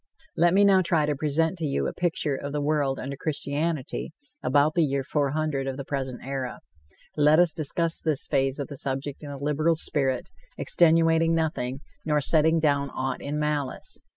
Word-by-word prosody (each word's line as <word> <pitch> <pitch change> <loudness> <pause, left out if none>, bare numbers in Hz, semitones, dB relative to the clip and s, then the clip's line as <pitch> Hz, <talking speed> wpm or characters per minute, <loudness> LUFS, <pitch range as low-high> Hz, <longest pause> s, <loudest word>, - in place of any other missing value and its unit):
Let 175 +2 +3
me 200 - +5
now 195 -1 +5
try 165 -4 +1
to 150 0 0
present 160 +4 0
to 160 - -2
you 140 - -1
a - - -2
picture 170 -4 0
of 140 +1 -6
the 150 - -1
world 145 -3 +1
under 140 +2 -5
Christianity 150 +1 -3 0.3
about 145 +4 +3
the 170 - +2
year 140 -2 0
400 145 0 -1
of 135 -1 -3
the 140 - -6
present 130 -3 -4
era. 135 -2 -4 0.5
Let 150 +1 +5
us 175 -1 +4
discuss 165 +2 0
this 155 -4 0
phase 135 0 0
of 140 - -4
the 140 - -7
subject 135 +1 -4
in 150 - -8
a 140 - -6
liberal 150 +4 +1
spirit, 135 -5 0 0.3
extenuating 165 0 +3
nothing, 140 -5 -2 0.2
nor 150 -1 +1
setting 160 +3 +3
down 140 -2 +1
aught 130 0 -3
in 145 +1 -3
malice. 150 -3 -3
150 Hz, 180 wpm, -26 LUFS, 140-160 Hz, 0.5 s, me